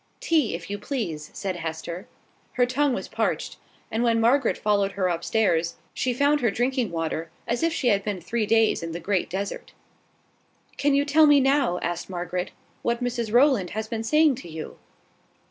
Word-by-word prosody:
"Tea, 305 - +1
if 170 - -8
you 205 - -3
please," 170 - -4
said 190 -3 -4
Hester. 165 +4 -5 0.5
Her 245 - +3
tongue 260 +1 +1
was - - -5
parched: - - -2 0.3
and 225 - 0
when 230 -1 +3
Margaret 250 +5 +3
followed 200 -2 +1
her 185 -1 0
up 170 0 -3
stairs, 175 -7 +1 0.2
she 255 - 0
found 285 +4 +2
her 235 - +3
drinking 245 +1 0
water, 165 -1 -3 0.2
as 235 - -1
if 330 0 +2
she 260 -5 +1
had 200 -2 +2
been 205 -3 -3
three 215 +5 -2
days 225 0 +3
deep 165 - -5
in 165 - -6
the 170 - -4
Great 190 +1 -1
Desert. 195 +2 -5 1.0
"Can 285 -1 +2
you 285 +1 +2
tell 310 +1 +5
me 290 -1 +7
now," 270 -8 +2
asked 175 +1 -3
Margaret, 180 0 -3 0.3
"what 235 +1 -1
Mrs 240 -3 -2
Rowland 240 -6 +4
has 220 0 -2
been 225 0 -3
saying 305 +4 +4
to 175 - -10
you?" 160 -1 -8
225 Hz, 190 wpm, -25 LUFS, 180-260 Hz, 1.0 s, me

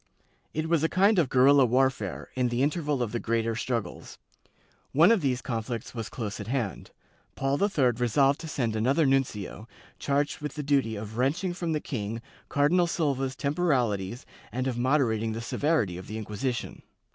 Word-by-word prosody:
It 155 +1 -2
was 165 -2 +2
a 160 - +2
kind 195 +2 +4
of 150 -7 +2
guerrilla 135 +2 +6
warfare, 130 +2 0
in 125 -1 +1
the 120 +2 0
interval 145 -3 0
of 110 - -4
the 120 - -2
greater 115 0 0
struggles.^ 115 -1 -4 0.8
One 165 +9 +6
of 225 -5 +3
these 130 -3 0
conflicts 115 -2 -4
was 115 -3 -5
close 110 -5 -5
at 105 - -6
hand. 120 -6 -3 0.5
Paul 135 +3 0
III 155 -12 +3
resolved 135 +4 +3
to 165 - -7
send 120 -7 -1
another 135 +8 +2
nuncio, 120 -6 -1 0.3
charged 145 +1 0
with 150 -2 -5
the 150 - -4
duty 135 -6 +1
of 105 +1 -7
wrenching 170 +8 +1
from 170 -2 -2
the 155 - 0
king 115 -5 -4 0.3
Cardinal 170 +5 +3
Silva's 135 -6 -1
temporalities 125 - 0 0.3
and 130 +1 -2
of 130 -2 -1
moderating 120 -4 +1
the 115 - -4
severity 115 - 0
of 95 - -10
the 110 - -5
Inqmsition. 115 +4 -4
130 Hz, 170 wpm, -27 LUFS, 115-150 Hz, 0.8 s, guerrilla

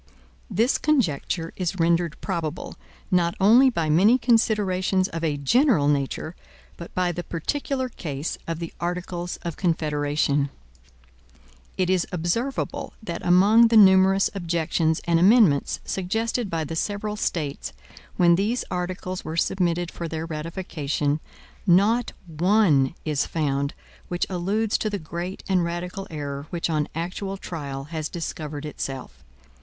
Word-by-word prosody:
This 230 +7 +2
conjecture 175 - 0
is 180 -1 -1
rendered 170 -1 +1
probable, 170 -4 -4 0.4
not 175 0 +2
only 235 +7 +6
by 170 -10 -1
many 190 +11 +5
considerations 205 -6 +2
of 165 0 -5
a 150 -3 0
general 195 - +3
nature, 145 +3 -1 0.4
but 170 - -9
by 180 -1 +1
the 175 +1 -5
particular 260 - -2
case 155 - -4
of 165 -1 -2
the 165 0 -6
Articles 175 0 -3
of 170 -2 -4
Confederation. 145 -4 0 1.3
It 185 - +1
is 185 -1 +1
observable 185 +10 -2
that 170 -5 -5
among 205 +6 +6
the 225 0 +4
numerous 190 -1 +6
objections 165 -3 0
and 170 -1 +2
amendments 185 - +4
suggested 225 +4 -1
by 165 -2 -1
the 155 +2 -5
several 205 +4 -2
States, 145 - -3 0.5
when 175 -1 +5
these 220 +6 0
articles 180 +1 -3
were 160 - -5
submitted 175 -1 0
for 170 - -5
their 160 0 -4
ratification, 155 -3 -2 0.5
not 205 +7 +4
one 165 -4 +3
is 150 -3 0
found 140 -3 -1 0.3
which 175 0 -1
alludes 200 +5 0
to 215 - -1
the 205 - -2
great 175 +2 -6
and 185 -2 +2
radical 180 +3 -4
error 145 -2 -5
which 170 -1 -2
on 150 -2 0
actual 190 +4 -4
trial 140 -7 -6
has 155 -1 -3
discovered 155 -3 -5
itself. 130 - -6
175 Hz, 135 wpm, -24 LUFS, 155-195 Hz, 1.3 s, only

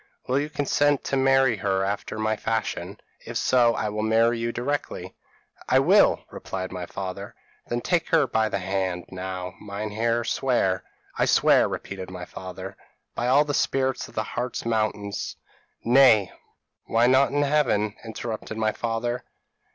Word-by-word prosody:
Will 130 +2 +1
you 145 +1 -2
consent 145 -1 +1
to - - -1
marry 135 -3 +3
her 95 -1 0
after 100 +2 -3
my 110 0 0
fashion? 110 +1 -3 0.2
if - - -4
so, 120 -2 +3
I 110 - -1
will 105 +1 -3
marry 115 +2 +3
you 115 0 -1
directly.' 140 +5 -3 0.6
"'I - - +5
will,' - - +4
replied 95 -1 -5
my 90 -2 -5
father. 95 +1 -6 0.3
"'Then 120 0 -2
take 170 +2 0
her 160 -3 +4
by 110 -3 +1
the - - -1
hand. 95 -2 -2
Now, 90 -1 -5
Meinheer, 110 +3 -2
swear.' 115 -8 +1 0.4
"'I - - +4
swear,' - - +4
repeated 95 -2 -6
my 90 -1 -7
father. 95 +1 -8 0.4
"'By 120 - -2
all 140 +4 +5
the 145 - -2
spirits 130 -1 0
of - - -17
the 110 - 0
Hartz 120 +2 -4
mountains 110 -3 -2 0.3
' - - -42
"'Nay, 120 -5 +5 0.5
why 115 +1 +3
not 130 +2 +4
by 145 +1 +2
Heaven?' 125 -8 +1
interrupted 110 -1 -6
my 110 -1 +1
father. 120 +2 -2
110 Hz, 160 wpm, -25 LUFS, 100-130 Hz, 0.6 s, I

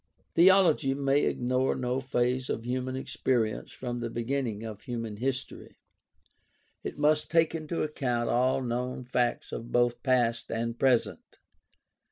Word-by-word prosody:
Theology 170 -6 +5
may 140 +1 +2
ignore 125 +2 +1
no 125 0 -1
phase 125 -1 0
of 115 - -3
human 130 +1 -2
experience 120 -4 -1
from 120 -1 -5
the 120 0 -3
beginning 115 -2 -2
of 110 -2 -7
human 115 -4 -5
history. 130 +3 -4 1.1
It - - -5
must 150 +1 +2
take 165 -1 +3
into 165 +1 -2
account 125 -6 -1
all 130 +2 +2
known 125 +1 -3
facts 125 -1 -1
of 115 - -6
both 120 0 +2
past 120 -3 +1
and 115 +1 -3
present. 130 -3 +1
125 Hz, 135 wpm, -29 LUFS, 120-135 Hz, 1.1 s, Theology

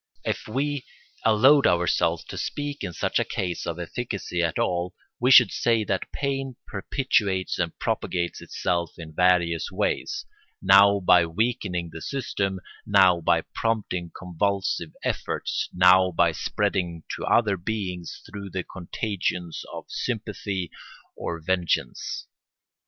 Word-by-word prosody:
If - - -2
we 140 +4 -1 0.4
allowed 130 +6 +6
ourselves 85 -1 +2
to - - -9
speak 145 -3 -4
in 95 - -3
such - - 0
a - - +2
case 90 -2 -3
of 85 -1 -3
efficacy 95 0 -3
at 85 -1 0
all, 90 +1 -1 0.2
we 125 - +2
should 130 - +8
say 115 -2 +2
that 95 -2 -2
pain 135 -2 -2
perpetuates 100 -4 0
and 85 -2 -2
propagates 85 -1 -2
itself 85 -2 -2
in 80 -2 -9
various 85 -1 +2
ways, - - -1 0.3
now 100 +1 +6
by 90 -2 +5
weakening 90 -3 -1
the 80 - -7
system, 100 - -2 0.2
now 90 -2 +5
by - - +3
prompting 100 -7 -1
convulsive 95 -1 -1
efforts, - - -2
now 90 +1 +6
by 85 -1 +3
spreading 90 -1 -1
to - - -7
other 110 -4 +3
beings 90 -2 -4
through 100 -1 -7
the 95 0 -3
contagion 90 -1 -3 0.2
of - - -7
sympathy 105 -6 -3 0.4
or 85 - -4
vengeance. 85 -7 -1
95 Hz, 130 wpm, -25 LUFS, 85-110 Hz, 0.4 s, should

